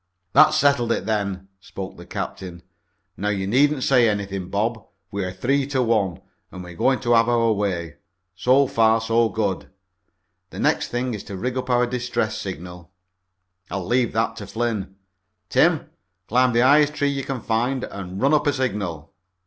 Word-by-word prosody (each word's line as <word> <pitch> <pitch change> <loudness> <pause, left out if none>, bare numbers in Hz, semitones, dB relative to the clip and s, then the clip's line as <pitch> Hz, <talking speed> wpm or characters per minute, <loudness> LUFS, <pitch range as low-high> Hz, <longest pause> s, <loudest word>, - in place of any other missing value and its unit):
"That's 155 0 +6
settled, 140 -5 +3
then," 100 -4 -2
spoke 95 -1 -8
the - - -13
captain. 90 -2 -6 0.5
"Now 105 - -1
you 100 -2 -1
needn't 135 +6 +2
say 125 -4 +4
anything, 100 -3 -3
Bob, 110 +2 -1 0.3
we're 95 -2 -3
three 135 +9 0
to 135 -3 0
one, 105 -7 0 0.3
and 90 - -8
we're 90 0 -10
going 130 +9 +2
to 120 -2 +2
have 115 0 +4
our 115 -2 +3
way. 85 -7 -3 0.4
So 130 +8 +3
far 115 -3 +3
so 115 0 +2
good. 100 -4 -2 0.8
The - - -11
next - - +1
thing 125 0 -2
is 105 - -6
to 100 - -7
rig 125 +5 -3
up 130 0 -4
our 125 0 +3
distress 120 -3 -2
signal. 90 -2 -7 0.8
I'll 95 -2 -4
leave 120 +3 +1
that 115 0 0
to 105 -3 -7
Flynn. 105 -3 -3 0.5
Tim, - - +2 0.4
climb 125 +1 +3
the 120 - +3
highest 145 +3 +4
tree 145 - +1
you 140 -1 -2
can 135 -1 -4
find 120 +4 -1
and 95 -1 -7
run 140 +3 +3
up 150 0 +2
a 145 - +3
signal." 100 - -3
115 Hz, 170 wpm, -23 LUFS, 95-125 Hz, 0.8 s, That's